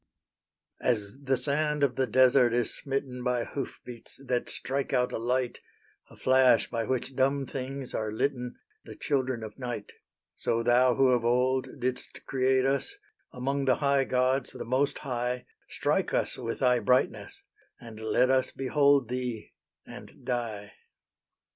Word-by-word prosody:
As 105 -4 0
the 135 -1 +1
sand 150 +3 0
of 130 -3 +2
the 130 0 +1
desert 125 0 +5
is 120 -1 0
smitten 135 -3 -4
By 125 -1 0
hoof 140 - -5
beats 120 0 -8
that 125 -2 -1
strike 135 +1 -3
out 125 -1 +2
a - - -2
light, 125 +1 -1 0.5
A - - -15
flash 130 -1 +4
by 115 -1 -1
which 130 +2 -2
dumb 135 +1 +1
things 135 0 -5
are 110 -1 -2
litten, 125 +2 -2 0.3
The - - -10
children 130 -5 -1
of 110 +3 -9
night; 120 -5 -5 0.4
So 115 0 -1
Thou 125 +1 +4
who 135 +1 +4
of 125 -2 +2
old 125 +2 +2
did'st 125 0 -4
create 130 0 +2
us, 135 0 0 0.4
Among 135 +2 -2
the 130 -2 +4
high 140 -2 +2
gods 130 +1 +1
the - - -7
Most 130 +4 +1
High, 125 -2 -3 0.2
Strike - - 0
us - - 0
with 115 - -5
Thy 125 -2 +4
brightness, 125 +2 0 0.4
and 115 -2 -11
let 110 +4 +2
us 130 -1 +2
Behold 140 -1 +3
Thee, 125 -3 -4 0.3
and - - -12
die. 110 -5 -3
125 Hz, 155 wpm, -28 LUFS, 120-135 Hz, 0.5 s, desert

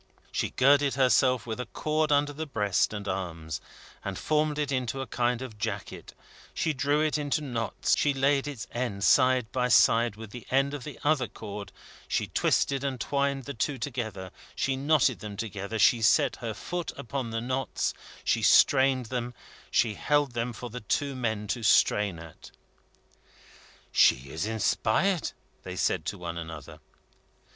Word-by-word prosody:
She - - -1
girded 140 +1 +3
herself 130 -1 +3
with 115 0 -5
a 125 - -4
cord 155 0 -1
under 145 0 +2
the 155 +2 -5
breast 105 -8 +1
and 105 -1 -6
arms, 85 -5 -4 0.4
she - - -4
formed 150 -1 0
it 145 -2 -1
into 130 0 -1
a 135 - -3
kind 125 +1 -1
of 110 -5 -9
jacket, 105 -3 -5 0.4
she 160 - 0
drew 145 +2 +1
it 155 -1 +1
into 145 +1 -1
knots, 120 -6 -1
she 145 - +2
laid 140 +1 +1
its 140 -7 -5
end 120 -5 -3
side 130 -2 +4
by 125 -1 0
side 115 0 +4
with 110 -1 -10
the 120 0 -10
end 135 +2 +2
of 145 -3 -5
the 150 - -8
other 145 -4 +2
cord, 105 -2 -8 0.4
she - - 0
twisted 135 -1 +1
and 135 -3 -2
twined 140 +1 0
the 140 - -6
two 135 +3 -1
together, 110 -7 -5 0.2
she 135 - 0
knotted 140 -2 +2
them 105 -2 -7
together, 105 0 -4
she 115 +2 +4
set 135 +2 +3
her 115 -3 -5
foot 175 -1 -4
upon 125 0 -4
the 115 0 -2
knots, 130 +3 -2 0.3
she - - +1
strained 130 -2 +5
them, 125 +1 -4 0.3
she 115 -2 +2
held 145 +4 +1
them 120 +1 -2
for 120 +1 -8
the 125 +1 -6
two 140 +6 -1
men 110 -4 -2
to 110 +3 -3
strain 105 -3 +3
at. 80 -1 -12 1.4
"She 65 +2 +4
is 85 +6 -3
inspired," 115 - +1 0.3
they - - -7
said - - 0
to - - -3
one 85 -1 -5
another. 80 -3 -9
125 Hz, 170 wpm, -28 LUFS, 110-140 Hz, 1.4 s, strained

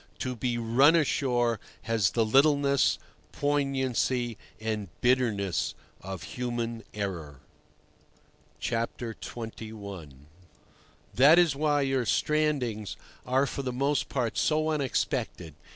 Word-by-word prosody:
To 130 -2 -3
be 120 0 -1
"run 125 +7 +5
ashore" 125 -7 +1 0.2
has 115 -5 +2
the 115 -2 +1
littleness, 140 +2 +4 0.3
poignancy, 130 -4 0 0.2
and 110 -2 -3
bitterness 115 -8 +1 0.3
of 95 -1 -6
human 120 -2 -3
error. 85 -10 -5 1.2
XXI. 110 - -5 1.0
That 145 +6 +7
is 170 -5 +4
why 145 0 +2
your 135 -2 +1
"strandings" 135 -7 0 0.3
are 130 +2 +3
for 140 - -4
the 130 -2 -3
most 140 +3 0
part 120 -4 -1
so 155 0 +2
unexpected. 130 - -2
125 Hz, 100 wpm, -28 LUFS, 110-140 Hz, 1.2 s, That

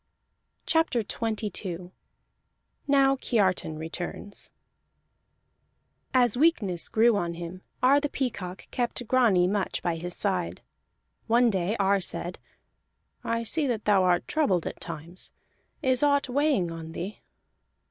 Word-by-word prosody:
CHAPTER 320 -7 +2
XXII 205 -5 -4 1.0
NOW 275 -1 +4
KIARTAN 190 - 0
RETURNS 175 +5 -6 1.6
As 245 -3 +3
weakness 235 - +2
grew 230 +1 +4
on 170 -4 -1
him, 175 +2 -7 0.2
Ar 275 +3 +6
the 290 0 -2
Peacock 195 -10 -4
kept 245 -1 -2
Grani 220 -9 +4
much 200 0 -1
by 170 -2 0
his 175 +2 -6
side. 185 -4 -1 0.6
One 235 +1 +4
day 190 +2 0
Ar 195 0 +3
said: 175 0 -3 0.8
"I 230 0 -1
see 295 +6 +1
that 230 -4 -2
thou 205 -2 +5
art 180 -1 +2
troubled 200 - +1
at - - -6
times. 170 +2 -7 0.5
Is 260 -2 +3
aught 285 -1 +3
weighing 270 - +2
on 165 -1 -7
thee?" 195 +6 -6
205 Hz, 120 wpm, -27 LUFS, 180-250 Hz, 1.6 s, Ar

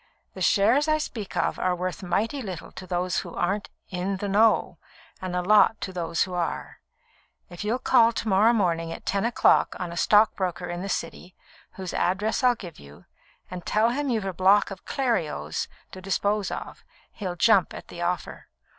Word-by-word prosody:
The - - -9
shares 230 +9 +3
I 310 0 +3
speak 225 -9 -5
of - - 0
are 180 -1 +1
worth 180 +2 -4
mighty 215 +9 -1
little 180 -7 -7
to 185 - -10
those 180 +1 -1
who - - -8
aren't 205 +1 -1 0.2
'in 190 +2 -2
the 205 - -4
know,' 200 -4 +3 0.4
and 185 -1 -4
a 180 - 0
lot 215 +3 +5
to 190 - -4
those 170 -2 0
who 185 - -6
are. 175 -2 -3 0.7
If 175 +3 -7
you'll 220 +4 0
call 235 -3 +4
to 225 - -4
morrow 210 +3 +5
morning 170 -7 0
at - - -8
ten 200 +2 0
o'clock 235 - +3
on 175 -2 -4
a - - -7
stockbroker 195 -5 +2
in 175 0 -5
the 195 - -5
City, 175 +1 -5 0.4
whose 185 -2 -6
address 205 +7 0
I'll 250 -1 +5
give 175 -7 -10
you, 70 +1 -15 0.5
and 180 -1 -6
tell 215 +6 +2
him 285 +2 -2
you've 220 -5 0
a 190 - -3
block 195 +4 +4
of 195 - -9
Clerios 160 - -1 0.2
to 185 - -9
dispose 200 +1 0
of, - - -7 0.3
he'll 185 -4 -5
jump 195 -1 +4
at - - -10
the 175 - -8
offer. 175 +1 -3
190 Hz, 190 wpm, -25 LUFS, 180-215 Hz, 0.7 s, lot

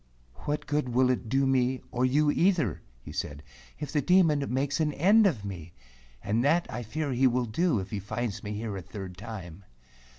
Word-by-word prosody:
"What 150 +1 -2
good 145 -3 -1
will 125 +1 +3
it 120 -3 -3
do 135 +2 +2
me, 130 -1 +2
or 125 +1 +1
you 145 +3 +3
either," 165 - +1 0.2
he - - -9
said, 75 0 -5 0.3
"if 150 0 -5
the 150 - +1
Demon 165 -5 +4
makes 140 +3 0
an 150 -2 +1
end 200 +8 +5
of 115 - -2
me? 85 -4 -7 0.5
And 110 +4 +1
that 165 +5 +3
I 120 - -4
fear 140 +6 -3
he 130 +1 +3
will 125 0 +1
do, 125 +5 +1
if 95 +1 -6
he 105 - -2
finds 105 +2 -4
me 105 - -5
here 105 -1 -4
a 95 - -5
third 95 +1 -8
time." 95 -3 -8
125 Hz, 200 wpm, -28 LUFS, 105-150 Hz, 0.5 s, end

